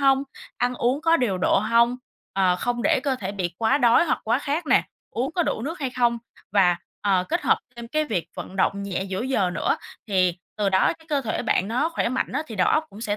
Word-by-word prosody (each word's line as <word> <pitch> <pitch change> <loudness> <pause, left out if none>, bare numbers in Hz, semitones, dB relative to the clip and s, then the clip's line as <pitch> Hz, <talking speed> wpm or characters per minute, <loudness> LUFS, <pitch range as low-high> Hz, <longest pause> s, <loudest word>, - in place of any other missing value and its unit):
hông, 270 -1 +4 0.3
ăn 245 0 0
uống 250 +4 0
có 330 +1 +4
điều 215 - 0
độ 180 - +3
hông? 235 +4 +3 0.4
Ờ, 185 -2 +3
không 240 +5 -2
để - - +3
cơ 280 -2 +1
thể 195 -5 -5
bị 180 -4 -3
quá 225 +4 +3
đói 240 +4 +5
hoặc 335 - 0
quá 235 +3 +2
khát 295 +4 -2
nè, - - +4 0.3
uống 255 +5 -2
có 350 - +1
đủ 285 -7 -2
nước 325 +6 -4
hay 265 -3 -1
không? 240 -2 +1 0.3
Và, 185 -4 +4 0.3
ờ, 190 -3 +2
kết - - 0
hợp - - +3 0.2
thêm 235 0 -8
cái 310 +4 0
việc 180 - -2
vận 190 - -7
động 200 +1 +1
nhẹ 195 -2 -2
giữa 190 +2 -3
giờ 245 -8 +1
nữa, 170 - 0 0.3
thì 185 -3 +2 0.2
từ 210 -2 +1
đó 190 -1 +3
cái 320 - -21
cơ 290 -2 +1
thể 230 -5 -2
bạn 205 -4 +1
nó 250 +8 +1
khỏe 330 - -1
mạnh 255 +2 -2
á, 285 +4 -1
thì 225 - -8
đầu 180 - +3
óc 310 - +2
cũng 205 - -11
sẽ 210 -2 -1
235 Hz, 245 wpm, -24 LUFS, 195-270 Hz, 0.4 s, đói